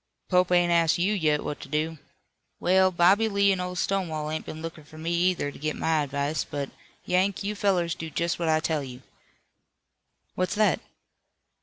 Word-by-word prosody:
"Pope 180 -1 +3
ain't 175 -1 +4
asked 165 -2 +3
you 185 +4 +1
yet 155 -6 +1
what 145 - -4
to - - -10
do. 155 +1 -1 0.6
Well, 185 +1 +4
Bobby 185 +5 +4
Lee 200 -1 +3
and 190 -1 0
Old 180 0 -4
Stonewall 160 -6 -1
ain't 155 - -4
been 155 - -6
lookin' 165 -2 -7
for 150 +2 -15
me 165 +2 -3
either 175 -4 +1
to - - -13
get 155 +1 -2
my 160 -1 +1
advice, 140 +1 -1
but, 140 -1 -5 0.3
Yank, 190 +2 +1
you 205 +1 -2
fellers 185 -5 +1
do 160 - -6
just 170 +3 -1
what 165 -2 0
I 155 0 +3
tell 155 -2 -1
you." 130 -1 -9 1.3
"What's 185 +2 -1
that?" 215 0 +3
170 Hz, 185 wpm, -26 LUFS, 155-185 Hz, 1.3 s, ain't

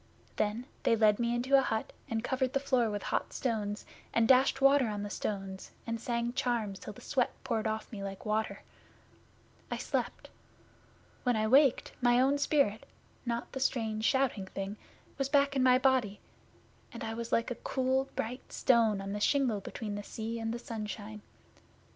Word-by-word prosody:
Then 215 +4 0 0.2
they 230 - +3
led 215 -1 +4
me 235 0 +1
into 255 +3 +2
a - - +3
hut 220 -4 -2 0.2
and 225 0 -1
covered 260 0 0
the 275 - +2
floor 255 -4 +2
with 205 -1 -3
hot - - -2
stones 215 -4 -2 0.3
and 230 -1 +4
dashed 265 +1 +5
water 275 -2 +5
on 205 -1 -3
the 205 - -5
stones, 195 -3 -4 0.2
and 230 -1 -3
sang 235 0 -1
charms 225 -6 -1
till - - -7
the - - -14
sweat 260 -4 +1
poured 230 -4 -1
off 220 0 -3
me 205 -3 -6
like 195 -1 -6
water. 215 +1 -1 1.1
I - - -2
slept. - - -3 0.9
When 245 -2 +2
I 215 0 +1
waked, 265 +3 +4
my 245 0 +5
own 275 +3 +3
spirit 280 -8 +1 0.4
not 235 0 -2
the 265 - -5
strange, 220 -5 0
shouting 255 -6 +1
thing 195 +2 -5 0.4
was 275 0 0
back 280 -1 +3
in 265 - +2
my 255 0 +6
body, 255 -6 +2 0.7
and - - -7
I 225 - -3
was 230 0 -5
like 230 +2 +1
a 240 - -6
cool 260 0 +1
bright 245 +3 -4
stone 225 -5 +3
on 195 0 -4
the 205 - -3
shingle 245 -3 +2
between 210 +2 -5
the 205 - -3
sea 225 +2 -5
and 225 0 -2
the 235 - -2
sunshine. 215 -3 -6
230 Hz, 180 wpm, -31 LUFS, 215-260 Hz, 1.1 s, my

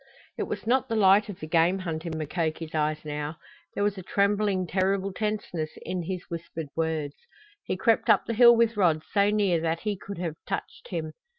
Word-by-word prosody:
It - - -3
was - - -5
not 260 +2 +2
the 225 - 0
light 205 0 +5
of 195 - -7
the - - -6
game 165 +3 +3
hunt 170 -3 -4
in 160 -1 -3
Mukoki's 160 +1 -3
eyes 155 0 -1
now; 150 +1 -4 0.4
there 200 - 0
was 205 -1 0
a - - -6
trembling, 200 0 +1
terrible 190 +2 0
tenseness 205 -7 -3
in 185 -1 -3
his 180 +1 -4
whispered 165 -3 -6
words. 160 -3 -1 0.5
He - - -2
crept 225 +4 +2
up - - +5
the 230 - -2
hill 235 +1 +8
with 230 0 +2
Rod 165 -5 +3
so 200 0 +3
near 200 -5 +2
that 165 0 -1
he 210 -1 -1
could 200 +1 -8
have 165 -3 -4
touched 195 - -5
him. 160 -4 -4
185 Hz, 200 wpm, -27 LUFS, 160-205 Hz, 0.5 s, hill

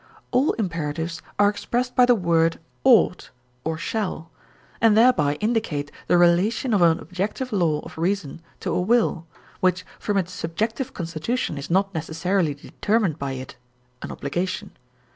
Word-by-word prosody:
All 260 +4 +3
imperatives 165 -4 -3 0.2
are 205 - +5
expressed 240 +5 -1
by 250 -1 +6
the 245 - +6
word 165 -4 +2 0.2
ought 235 -7 +4 0.3
[or 160 0 -2
shall], 165 -3 -3 0.5
and 225 -2 +5
thereby 180 - +4
indicate 195 -8 -1 0.2
the - - +4
relation 185 +8 +3
of 200 - +3
an 165 -1 +5
objective 210 +7 -4
law 165 -6 +1
of - - -11
reason 170 -3 -1 0.2
to - - -2
a - - +1
will, 205 -5 +1 0.3
which 185 0 +1
from 205 -1 -1
its 185 -2 -1
subjective 220 - -3
constitution 170 +5 -2
is 140 0 -6
not 195 +3 +2
necessarily 165 0 0
determined 195 +2 -1
by 140 -1 -3
it 130 -1 -8 0.4
(an - - -6
obligation). 185 +7 -3
180 Hz, 145 wpm, -24 LUFS, 165-215 Hz, 0.5 s, by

